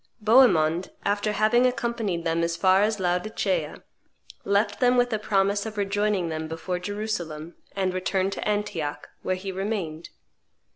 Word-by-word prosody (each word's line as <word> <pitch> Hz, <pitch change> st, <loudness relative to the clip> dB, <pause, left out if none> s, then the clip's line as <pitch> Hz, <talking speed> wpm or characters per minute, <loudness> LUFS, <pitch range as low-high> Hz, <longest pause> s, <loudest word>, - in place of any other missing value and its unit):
Bohemond, 190 Hz, -8 st, +4 dB, 0.2 s
after 205 Hz, +1 st, +1 dB
having 215 Hz, +4 st, +3 dB
accompanied 235 Hz, -8 st, -2 dB
them 165 Hz, 0 st, +1 dB
as 170 Hz, 0 st, -1 dB
far 190 Hz, +2 st, +4 dB
as 215 Hz, 0 st, +1 dB
Laodicea, 185 Hz, -, -1 dB, 0.6 s
left 205 Hz, +1 st, +1 dB
them 250 Hz, 0 st, +4 dB
with 245 Hz, -1 st, +2 dB
a 215 Hz, -, 0 dB
promise 200 Hz, 0 st, +1 dB
of 220 Hz, -1 st, -8 dB
rejoining 200 Hz, -2 st, 0 dB
them 160 Hz, 0 st, -4 dB
before 165 Hz, +3 st, -4 dB
Jerusalem, 180 Hz, -5 st, -4 dB, 0.2 s
and 190 Hz, -2 st, 0 dB
returned 190 Hz, +1 st, 0 dB
to -, -, -4 dB
Antioch, 205 Hz, -8 st, -2 dB
where 185 Hz, -, -1 dB
he 190 Hz, +1 st, -5 dB
remained. 190 Hz, -5 st, -4 dB
195 Hz, 145 wpm, -25 LUFS, 175-215 Hz, 0.6 s, Bohemond